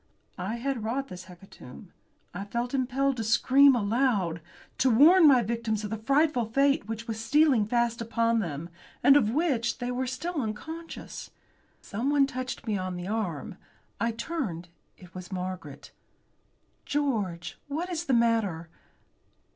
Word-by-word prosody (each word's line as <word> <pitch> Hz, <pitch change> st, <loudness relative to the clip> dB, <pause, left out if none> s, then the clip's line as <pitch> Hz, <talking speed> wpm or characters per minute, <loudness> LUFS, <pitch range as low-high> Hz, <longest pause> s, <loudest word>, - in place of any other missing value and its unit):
I 190 Hz, +6 st, -3 dB
had 245 Hz, -1 st, -3 dB
wrought 270 Hz, +5 st, -2 dB
this 180 Hz, 0 st, -9 dB
hecatomb. 180 Hz, -, -14 dB, 0.4 s
I 195 Hz, +3 st, -5 dB
felt 235 Hz, +5 st, -3 dB
impelled 270 Hz, 0 st, 0 dB
to 225 Hz, -, -2 dB
scream 260 Hz, +5 st, +5 dB
aloud. 205 Hz, -7 st, 0 dB, 0.4 s
To 265 Hz, -, +4 dB
warn 315 Hz, +9 st, +7 dB
my 255 Hz, -4 st, +6 dB
victims 225 Hz, -1 st, -2 dB
of 210 Hz, -, -5 dB
the 225 Hz, -, -2 dB
frightful 275 Hz, +1 st, +2 dB
fate 275 Hz, +2 st, +1 dB
which 225 Hz, +1 st, -5 dB
was 220 Hz, -1 st, -4 dB
stealing 280 Hz, -6 st, +3 dB
fast 235 Hz, 0 st, 0 dB
upon 230 Hz, 0 st, +1 dB
them, 165 Hz, -4 st, -4 dB, 0.3 s
and 280 Hz, -, +7 dB
of 245 Hz, -8 st, +4 dB
which 245 Hz, -4 st, 0 dB
they 245 Hz, 0 st, -3 dB
were 255 Hz, +1 st, -2 dB
still 310 Hz, +5 st, -3 dB
unconscious. 320 Hz, +10 st, -7 dB, 0.5 s
Someone 275 Hz, +7 st, +1 dB
touched 255 Hz, -1 st, -5 dB
me 210 Hz, -4 st, -1 dB
on 185 Hz, -1 st, -4 dB
the 175 Hz, +1 st, -6 dB
arm. 200 Hz, -9 st, -3 dB, 0.4 s
I 230 Hz, -, +1 dB
turned. 225 Hz, -, -4 dB, 0.3 s
It 180 Hz, -2 st, -16 dB
was 180 Hz, 0 st, -9 dB
Margaret! 180 Hz, -6 st, -6 dB, 0.9 s
"George, 215 Hz, -13 st, -2 dB
what 325 Hz, +6 st, -3 dB
is 340 Hz, -1 st, -3 dB
the 270 Hz, -, 0 dB
matter?" 225 Hz, -8 st, +1 dB
230 Hz, 145 wpm, -27 LUFS, 200-275 Hz, 0.9 s, warn